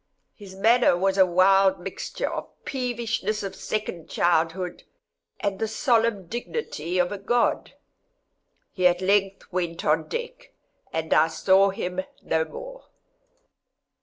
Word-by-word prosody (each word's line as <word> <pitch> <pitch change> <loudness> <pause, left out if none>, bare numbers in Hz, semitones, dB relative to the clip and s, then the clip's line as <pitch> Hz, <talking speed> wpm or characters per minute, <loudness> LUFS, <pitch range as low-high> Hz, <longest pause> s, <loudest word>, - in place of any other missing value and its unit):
His 195 -3 -12
manner 225 -1 +4
was 195 +1 +1
a 190 - +7
wild 190 +2 +4
mixture - - -4
of - - -4
the - - -33
peevishness 235 -4 -2
of 195 - -5
second 210 -6 -4
childhood, 170 +1 0 0.6
and 200 -2 -2
the 220 - 0
solemn 225 -4 +1
dignity 185 - -4
of 180 +1 +2
a 205 - -4
God. 240 +4 0 1.0
He 185 -2 +3
at 175 0 +1
length 195 0 +1
went 170 -2 -2
on 155 +1 +2
deck, 485 +1 -6 0.4
and 160 0 -1
I 155 +1 +5
saw 190 +4 +3
him 185 -2 -3 0.2
no 160 0 +1
more. - - -10
195 Hz, 135 wpm, -25 LUFS, 180-225 Hz, 1.0 s, a